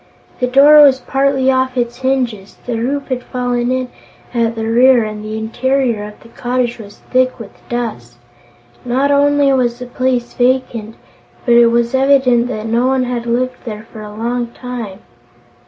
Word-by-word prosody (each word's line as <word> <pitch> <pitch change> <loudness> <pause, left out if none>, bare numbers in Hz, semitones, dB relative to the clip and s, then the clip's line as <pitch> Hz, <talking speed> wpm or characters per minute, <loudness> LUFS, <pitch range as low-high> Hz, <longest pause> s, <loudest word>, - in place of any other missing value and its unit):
The 250 - +1
door 285 +4 +7
was 275 -3 +6
partly 270 0 +1
off 260 0 0
its 240 0 -2
hinges, 250 -7 -2
the 235 -2 -3
roof 275 +5 -3
had 255 -1 -2
fallen 245 -1 -2
in 255 -1 -2 0.4
at 230 -1 0
the 225 0 -3
rear 240 +2 +4
and 215 0 -6
the 215 0 -5
interior 240 0 -1
of 210 0 -11
the 230 - -16
cottage 245 0 -2
was 205 -2 -11
thick 255 0 +2
with 225 -5 -10 0.2
dust. 225 - -5 0.7
Not 260 +3 0
only 285 -1 +3
was 240 -2 0
the 250 - -7
place 250 -1 -2
vacant, 245 -3 -1 0.5
but 240 - +3
it 235 0 +6
was 235 +1 +1
evident 265 -3 +3
that 215 -3 -5
no 235 +3 +1
one 265 -1 +1
had 245 -1 -4
lived 250 +2 -1
there 215 -2 -7
for 220 - -9
a 210 - -8
long 235 +3 -3
time. 235 -4 -8
245 Hz, 170 wpm, -16 LUFS, 230-260 Hz, 0.7 s, door